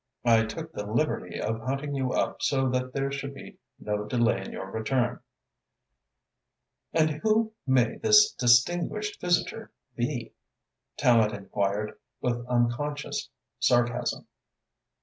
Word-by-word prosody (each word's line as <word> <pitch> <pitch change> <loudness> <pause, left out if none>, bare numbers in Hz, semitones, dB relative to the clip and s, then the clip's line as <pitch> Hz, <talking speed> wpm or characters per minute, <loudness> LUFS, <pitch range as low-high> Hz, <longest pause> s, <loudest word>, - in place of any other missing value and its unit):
I 115 -1 +5
took 160 +8 -6
the 105 - -5
liberty 115 - -1
of 110 +1 -2
hunting 135 +4 -3
you 130 -2 -1
up - - -1
so 135 -1 +2
that 125 0 -1
there 135 +1 -1
should 140 0 -5
be - - -11 0.2
no 105 0 -2
delay 115 -2 +1
in - - -8
your 95 0 -7
return." 120 +3 0 1.7
"And 155 -1 +3
who 220 0 +2
may 125 -3 +3
this 430 0 +6
distinguished 175 - +2
visitor 175 -1 0 0.3
he?" - - -3 0.6
Tallente 110 -4 +4
enquired, 100 +1 -2 0.2
with 120 -1 -1
unconscious 125 +5 -1 0.3
sarcasm. 120 -1 +1
125 Hz, 120 wpm, -27 LUFS, 115-145 Hz, 1.7 s, this